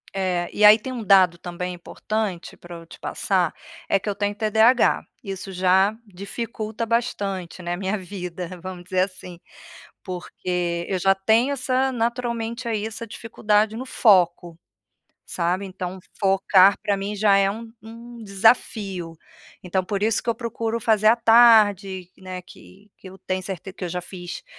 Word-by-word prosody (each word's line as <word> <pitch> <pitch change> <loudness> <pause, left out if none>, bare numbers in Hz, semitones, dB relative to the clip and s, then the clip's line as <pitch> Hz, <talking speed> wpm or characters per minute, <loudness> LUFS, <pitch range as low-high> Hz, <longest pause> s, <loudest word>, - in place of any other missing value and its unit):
É, 180 -2 -1
e 210 - 0
aí 210 +1 +9
tem 255 +4 -7
um 235 -3 -5
dado 185 -3 +5
também 180 0 -5
importante 195 +1 -4
pra 175 0 -11
eu 165 0 -11
te 165 - -14
passar, - - 0 0.4
é 195 - +3
que 195 - -11
eu 205 - 0
tenho 205 0 -2
TDAH. 220 +3 +3 0.2
Isso 195 -1 -6
já 190 +3 +2
dificulta 215 +3 -5
bastante, 195 -6 -2
né, 175 0 -2
minha 195 +3 -2
vida, 180 -2 -6
vamos 185 0 -8
dizer 185 +1 0
assim. 185 -2 -5 0.6
Porque 180 -1 -4
eu 190 - -1
já 195 +2 +3
tenho 220 +7 +2
essa 260 0 0
naturalmente 235 0 -2
aí, 220 -2 -1
essa 225 +1 -6
dificuldade 215 -1 0
no 255 - -5
foco, 175 -8 +2 0.7
sabe, 180 +3 -1
então 185 0 -6 0.2
focar 195 0 +5
pra 200 - 0
mim 200 +2 -4
já 205 -1 +4
é 195 0 +3
um 225 +2 -8
um 230 +1 -11
desafio. 195 -4 +1 0.5
Então 185 +1 0
por 200 0 -3
isso 220 +1 +1
que 240 - -1
eu 230 - -1
procuro 230 -1 -3
fazer 215 -1 +3
à 225 - +5
tarde, 215 -6 +5
né, 185 -1 -7
que 190 +2 -17
que 190 - -12
eu 190 - -14
tenho 185 0 -3
certe 190 0 -7
que 185 - -7
eu - - -3
já 180 +1 -3
fiz 180 - -8
195 Hz, 165 wpm, -23 LUFS, 185-225 Hz, 0.7 s, aí